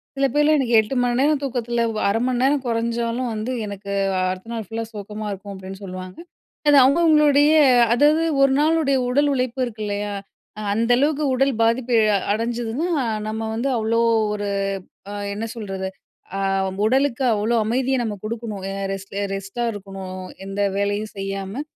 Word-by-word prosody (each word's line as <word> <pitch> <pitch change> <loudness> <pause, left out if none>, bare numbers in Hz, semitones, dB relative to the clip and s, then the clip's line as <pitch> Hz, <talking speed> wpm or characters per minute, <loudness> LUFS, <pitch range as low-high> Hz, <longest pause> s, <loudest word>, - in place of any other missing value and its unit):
சில 275 - +2
பேர்லாம் 295 +1 +4
"எனக்கு 240 -3 +3
8 220 +5 -1
மணிநேரம் 270 +4 +2
தூக்கத்தில 240 -3 -1
வ - - -3
1/2 225 - +1
மண் 250 -1 0
நேரம் 275 0 +2
கொறஞ்சாலும் 235 +1 -1
வந்து 220 +4 -3
எனக்கு 200 0 -7 0.3
அ - - +1
அடுத்த 185 +5 -7
நாள் 225 -3 -4
ஃபுல்லா 225 0 -4
சோக்கமா 210 +1 -6
இருக்கும்." 200 +1 -7
அப்டின்னு 190 +1 -9
சொல்லவாங்க. 185 -1 -7 0.5
அது 290 - +7
அவுங்க 280 +6 +4
அவுங்களுடைய 300 -2 +5 0.4
அதாவது 300 +5 +4 0.2
ஒரு 275 -1 +5
நாளுடைய 310 -3 +3
உடல் 285 +3 +3
உழைப்பு 255 0 -2
இருக்கு 215 -2 -6
இல்லயா! 205 0 -3 0.5
அ - - -5
அந்த 230 +3 +1
அளவுக்கு 295 +2 +1
உடல் 270 +1 +2
பாதிப்பு 235 +1 +1 0.2
அ - - +4 0.2
அடஞ்சிதுன்னா, 235 +7 -2 0.4
நம்ம 220 +1 -3
வந்து 250 +5 -1
அவ்ளோ 225 +1 +1 0.3
ஒரு 205 -1 -3 0.6
அ - - -6 0.2
என்ன 215 - -4
சொல்றது? 195 -3 -4 0.5
அ - - -2 0.5
உடலுக்கு 265 +2 +2
அவ்ளோ 220 +3 0
அமைதிய 255 +4 0
நம்ம 215 -3 -2
குடுக்கணும். 220 -3 -5
அ - - -4 0.2
ரெஸ்ட்டு, 195 +1 -5
ரெஸ்ட்டா 195 +5 -4
இருக்கணும். 195 -2 -7 0.2
எந்த 195 +1 -4 0.2
வேலையும் 205 +1 -1
செய்யாம 195 +6 -4
230 Hz, 160 wpm, -22 LUFS, 205-265 Hz, 0.6 s, அது